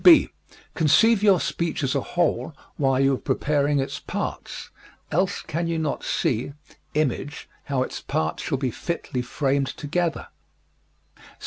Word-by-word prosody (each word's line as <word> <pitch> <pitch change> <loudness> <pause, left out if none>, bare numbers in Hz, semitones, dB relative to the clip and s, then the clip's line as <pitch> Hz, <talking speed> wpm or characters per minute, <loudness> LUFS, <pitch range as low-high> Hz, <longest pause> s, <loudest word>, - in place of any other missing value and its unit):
(b) 345 -3 +8 0.4
Conceive 200 +7 +5
your 200 -4 +5
speech 170 -3 -1
as 130 - +1
a - - +1
whole - - 0 0.2
while 135 -2 +2
you 135 0 +4
are - - 0
preparing 145 -1 +1
its 135 - -2
parts, - - -5 0.4
else 185 +4 +1
can 165 +2 -2
you 165 -1 0
not 155 -3 -2
see 125 +4 0 0.4
image 150 0 -1 0.2
how 135 -3 +1
its - - -6
parts 80 +1 -1
shall 140 - -1
be 130 -2 -1
fitly 135 -3 -3
framed 135 +2 0
together. 160 +5 -2
145 Hz, 140 wpm, -25 LUFS, 135-170 Hz, 0.4 s, b